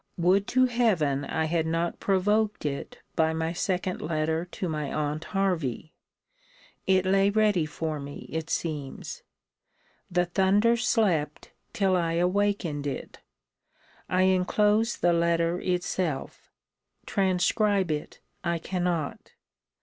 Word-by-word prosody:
Would 185 +3 +3
to 255 0 +4
Heaven 185 - +1
I 160 0 -1
had 160 0 0
not 165 +1 -1
provoked 210 +1 +1
it 140 -1 -4 0.2
by 160 0 +2
my 160 +1 -1
second 185 +1 -2
letter 160 +1 -1
to 180 +1 -5
my 150 -3 -3
aunt 150 +1 -2
Hervey! 170 - -1 0.9
It 190 -1 +3
lay 195 +1 +4
ready 205 -6 +2
for 155 0 -3
me, 140 0 -8
it 160 0 -3
seems. 150 -6 -4 0.9
The 180 0 +2
thunder 195 +6 +3
slept, 195 -11 0 0.2
till 195 -2 +2
I 165 -2 +1
awakened 180 -4 0
it. 140 - -6 0.9
I 185 +1 +3
enclose 210 +4 +2
the 175 0 +3
letter 170 +1 +1
itself. 175 -5 -2 0.5
Transcribe 190 0 +1
it 150 -1 -5 0.2
I 170 -1 0
cannot. 175 -3 -3
175 Hz, 120 wpm, -27 LUFS, 160-195 Hz, 0.9 s, to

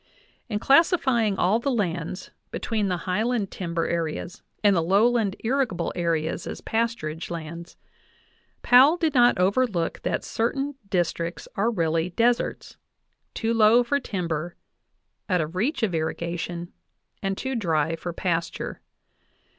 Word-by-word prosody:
In 210 - -1
classifying 265 - +3
all 200 +6 +3
the 275 - -1
lands 185 -6 -2 0.2
between 215 -3 -1
the 180 -2 0
highland 210 +2 0
timber 170 -2 -2
areas 170 +1 -3 0.2
and 205 -2 +5
the 170 - +3
lowland 205 +3 +2
irrigable 245 -5 0
areas 165 -1 -1
as - - -5
pasturage 220 -9 -2
lands, 170 0 -7 0.9
Powell 270 +7 +7
did 320 -4 0
not 245 -4 +5
overlook 190 -2 +1
that - - -1
certain 270 +5 -1 0.2
districts 170 -3 -1
are 210 +4 +2
really 165 -5 0
deserts, 235 +6 0 0.6
too 225 0 0
low 225 +2 +5
for 280 +4 0
timber, 175 - -3 0.7
out 180 -2 +2
of 160 +2 -3
reach 255 - 0
of 200 -5 +1
irrigation, 170 +2 -3 0.5
and 195 -1 -2
too 265 0 -3
dry 165 - 0
for 175 +2 -5
pasture. 170 -1 -3
190 Hz, 130 wpm, -25 LUFS, 170-235 Hz, 0.9 s, Powell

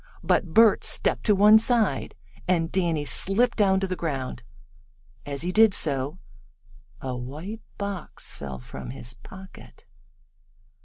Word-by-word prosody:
But - - +1
Bert 225 -1 +5
stepped - - +1
to 210 - +5
one 210 +2 +7
side, 225 -2 0 0.3
and 170 -2 +1
Danny 170 -5 0
slipped 230 +10 +3
down 195 -3 +3
to - - 0
the 185 - -3
ground. 135 -8 -4 0.9
As 140 +1 -4
he 180 - -2
did 215 0 +5
so 140 +1 -2 0.8
a 130 -1 -4
white 150 - -7 0.2
box 200 -2 -5
fell 70 -2 -7
from 60 - -9
his 125 -1 -7
pocket. 190 +10 -14
180 Hz, 135 wpm, -25 LUFS, 135-205 Hz, 0.9 s, one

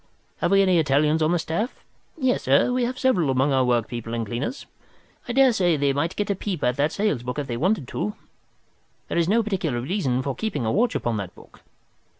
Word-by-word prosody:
Have - - 0
we 195 0 +5
any 185 -3 +3
Italians 150 +1 +2
on 155 +1 +2
the 175 - +2
staff? 170 - -2 0.4
Yes, 260 -4 +1
sir, 140 - +3
we 250 -1 +1
have 255 +1 -4
several 190 - +2
among 135 +2 +2
our 130 -1 +3
workpeople 120 -1 -1
and 115 -1 -2
cleaners. 120 - -4 0.6
I 240 - -3
daresay 225 - +4
they 140 -1 +1
might 155 +5 -1
get 205 -1 -1
a - - 0
peep 190 -3 -4
at 125 0 +2
that 145 +2 +1
sales 200 - 0
book 125 +2 -5
if 145 - -2
they 120 - -4
wanted 160 - 0
to. 105 0 -3 0.9
There - - -2
is 170 +1 +1
no 230 +3 +3
particular 175 - -2
reason 130 -3 -1
for 140 - -2
keeping 150 - -3
a 110 - +1
watch 235 +2 +1
upon 120 -2 -1
that 95 -3 -6
book. - - -17
155 Hz, 215 wpm, -24 LUFS, 130-205 Hz, 0.9 s, we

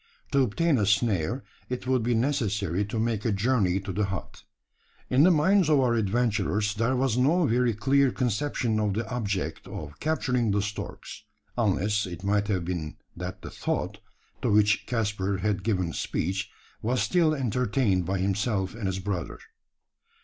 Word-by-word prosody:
To 140 - +4
obtain 135 +4 +2
a 100 - +1
snare, 105 - +1 0.3
it 125 0 -4
would 130 -1 +2
be 120 +1 +1
necessary 105 - 0
to 105 +3 -4
make 110 -2 0
a 115 - +1
journey 100 -3 +2
to 95 - -5
the 105 +3 +1
hut. 95 -1 -6 0.7
In 130 +2 +5
the 170 - +7
minds 180 +2 +4
of 150 -2 +5
our 125 -3 +3
adventurers 105 -2 +1
there 115 +4 +1
was 125 -2 +1
no 160 +7 +3
very 120 -2 +2
clear 135 +5 +3
conception 120 -1 0
of 105 -2 0
the 110 +1 -2
object 100 -6 -3
of 75 -1 -8
capturing 125 -7 0
the 100 0 +1
storks: 105 0 -6 0.3
unless 105 -2 +1
it 90 +1 -8
might 100 +1 +1
have 95 -5 -1
been 85 -4 -4 0.2
that - - -6
the - - -7
thought, - - -3 0.4
to - - 0
which 105 0 +3
Caspar 105 -4 -1
had 100 0 -1
given 90 -5 -1
speech, 95 +4 -2 0.3
was 125 +3 0
still 165 -4 +3
entertained 125 -6 +1
by 95 +3 -1
himself 100 +1 0
and 110 -3 -4
his 95 0 -1
brother. 95 -3 -3
105 Hz, 165 wpm, -27 LUFS, 100-125 Hz, 0.7 s, the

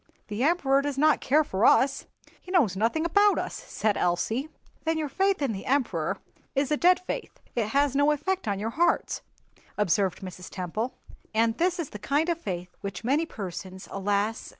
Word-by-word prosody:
"The 210 +2 -3
Emperor 280 -4 +3
does 285 -1 -3
not 305 +2 +4
care 300 +4 +4
for 195 -7 -2
us; 270 +3 +4 0.3
he - - -14
knows 290 - +3
nothing 230 - +1
about 405 +4 +4
us," - - -2
said 215 -2 -1
Elsie. 220 - 0 0.3
"Then 325 0 0
your 310 -1 -1
faith 385 +2 +1
in 270 - +1
the 195 -2 -6
Emperor 200 - 0 0.4
is 275 +1 +1
a - - +4
dead 355 +4 +4
faith, 410 +6 -6 0.2
it 230 -3 +1
has 280 +3 +2
no 285 +1 +4
effect 300 +1 -1
on 200 -1 0
your 220 +3 -3
hearts," 340 +8 +1 0.6
observed 195 -1 +1
Mrs. 185 -1 -8
Temple. 210 +7 -3 0.4
"And 225 0 +3
this 360 +2 +2
is 335 -5 -4
the 210 - -7
kind 295 - +1
of 335 -1 -1
faith 180 - -5
which 200 0 -5
many 290 +7 +1
persons, 185 - -7
alas! 205 +3 -1
260 Hz, 185 wpm, -27 LUFS, 200-310 Hz, 0.6 s, not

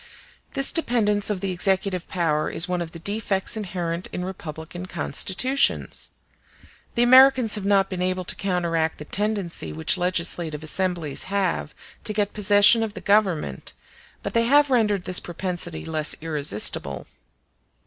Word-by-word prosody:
This 275 -1 +5
dependence 215 - +1
of 200 -3 -2
the 195 - -2
executive 185 0 0
power 160 -4 0
is 170 - 0
one 180 -1 -2
of 165 -1 -5
the 165 - -9
defects 200 +3 -1
inherent 175 -4 -4
in 180 - -4
republican 175 -1 -8
constitutions. 255 +10 0 0.9
The 235 - +3
Americans 255 -2 +6
have 210 -3 0
not 200 -1 +3
been 185 -2 -5
able 185 0 -1
to - - -1
counteract 170 -4 -1
the 150 - -9
tendency 200 - -2
which 80 - +1
legislative 170 -3 -1
assemblies 170 -3 -1
have 190 -6 -2 0.3
to 215 - -1
get 205 -1 -1
possession 205 +2 +5
of 220 -1 -3
the - - -6
government, 190 - 0 0.5
but - - -4
they 230 0 +2
have 285 +3 +4
rendered 210 -6 +1
this 185 - +2
propensity 175 -1 -5
less 155 -2 0
irresistible. 140 - 0
185 Hz, 145 wpm, -23 LUFS, 165-210 Hz, 0.9 s, Americans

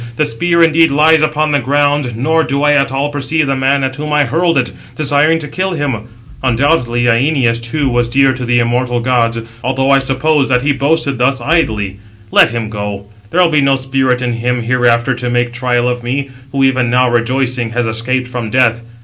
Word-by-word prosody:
The 150 - +1
spear 170 +7 +1
indeed 165 0 +4
lies 155 +2 +4
upon 155 0 0
the 145 - +2
ground, 145 -2 0
nor 160 +6 +1
do 140 -1 -2
I 150 - +4
at 140 -2 +1
all 140 +2 -1
perceive 145 +2 -1
the 135 -1 -1
man 135 +1 +1
at 130 0 -3
whom 150 +1 -5
I 150 0 +3
hurled 165 +5 0
it, 125 -3 0 0.2
desiring 150 +2 +2
to 155 -2 -5
kill 185 +6 -3
him. 135 -8 -3 0.4
Undoubtedly 125 -1 +1
Æneas, 120 -1 +1
too, 140 +5 -2
was 120 -2 0
dear 135 +1 +3
to 130 0 -6
the 120 0 +1
immortal 120 +1 0
gods, 115 -2 0 0.2
although 135 +2 0
I 135 - +5
supposed 135 +2 0
that 125 0 +1
he 145 - +2
boasted 140 -1 -1
thus 130 +2 +1
idly. 110 - -1 0.3
Let - - +5
him 115 -1 -4
go; 105 -2 -6 0.2
there 180 - +1
will 175 - +2
be 150 -2 +2
no 135 0 +2
spirit 130 -1 -1
in 120 -1 -1
him 120 +1 -2
hereafter 120 +1 +1
to 125 0 -4
make 120 0 -1
trial 120 0 0
of 125 0 -2
me, 135 +3 -3 0.2
who 135 -1 0
even 130 -2 +1
now 125 +1 +2
rejoicing, 120 0 -1
has 120 0 -1
escaped 120 +3 -1
from 125 -3 -5
death. 115 -1 +2
130 Hz, 205 wpm, -14 LUFS, 120-145 Hz, 0.4 s, I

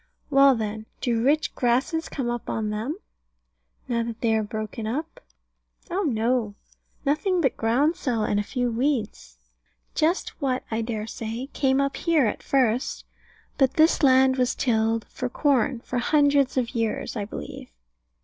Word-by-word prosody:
Well 275 -1 +6
then, 220 -1 -4
do 235 -2 0
rich 300 +4 +2
grasses 260 +7 0
come 265 -4 -3
up 240 0 -3
on 215 -1 -2
them, 225 - -3 0.9
now 235 -1 0
that 230 -1 -5
they 230 -2 +2
are 220 - +2
broken 215 0 -5
up? 305 +8 -4 0.7
Oh 375 +3 0
no, 230 - 0 0.5
nothing 310 +6 +1
but 270 -7 +1
groundsel, 245 0 +1
and 205 -1 +1
a - - 0
few 245 +2 -2
weeds. 225 - -2 0.6
Just 330 +4 +1
what, 260 -2 0
I 220 +1 0
dare 220 -2 -3
say, 230 +4 -5
came 265 -1 +2
up 275 0 0
here 325 -6 +2
at 210 - -2
first. 250 -2 0 0.5
But 270 -2 +3
this 315 +1 +4
land 260 -1 +5
was 250 -1 +1
tilled 225 -2 +1
for 250 - -4
corn, 265 -3 +1
for 245 - -3
hundreds 285 0 +3
of 240 -2 0
years, 225 0 -2
I 205 -3 -2
believe. 75 - -8
245 Hz, 155 wpm, -25 LUFS, 225-275 Hz, 0.9 s, Well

